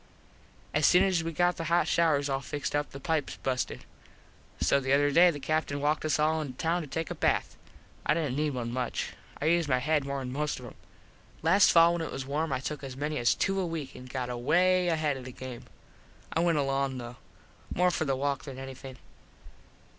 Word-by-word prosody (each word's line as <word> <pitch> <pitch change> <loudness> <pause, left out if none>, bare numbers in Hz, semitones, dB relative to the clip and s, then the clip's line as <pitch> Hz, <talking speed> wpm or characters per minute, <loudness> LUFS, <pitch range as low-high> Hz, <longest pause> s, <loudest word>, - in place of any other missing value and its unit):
As - - +4
soon 180 +1 +6
as 185 -4 +1
we 165 - -3
got 175 +2 +1
the 165 - -4
hot 170 +2 +2
shouers 150 -4 +2
all 135 -1 -1
fixed 145 +1 -4
the 145 -1 -2
pipes 160 -1 -1
busted. 130 -1 -3 0.7
So 140 - +3
the 135 0 0
other 145 +1 +4
day 175 +5 +7
the 150 -4 -3
Captin 145 0 -1
walked 150 +2 0
us 155 -3 +2
all 155 +1 +2
in 140 -4 -5
town 165 +5 0
to 155 - -7
take 160 +3 -3
a - - 0
bath. - - 0 0.5
I - - +2
didnt 150 -6 -1
need 150 -1 0
one 120 -2 -3
much. 125 -1 -3 0.3
I - - -3
used 165 -1 +2
my 130 - +3
head 150 +3 +1
more 140 0 -3
than 130 -2 -4
most 150 0 -2
of 125 - -10
em. 120 - -10 0.7
Last 200 +1 +5
fall 170 0 +6
when 170 - -2
it 160 - -4
was 135 -1 -5
warm 150 +3 -1
I 130 - 0
took 150 +1 -5
as 130 -1 -7
many 150 +2 -2
as 120 - +3
two 195 0 0
a 185 - 0
week 160 -5 -5
an 125 - -10
got 125 -1 -4
away 180 +9 +2
ahead 155 -4 +1
of 130 - -9
the 130 - -7
game. 125 -1 -8 0.7
I - - +1
went 170 -2 +2
along 135 -1 0
though. 120 0 -8 0.5
More 180 +1 +2
for 160 - -1
the 135 -2 +1
walk 140 0 -2
than 135 -3 -8
anything. 135 0 -8
145 Hz, 220 wpm, -29 LUFS, 135-165 Hz, 0.7 s, day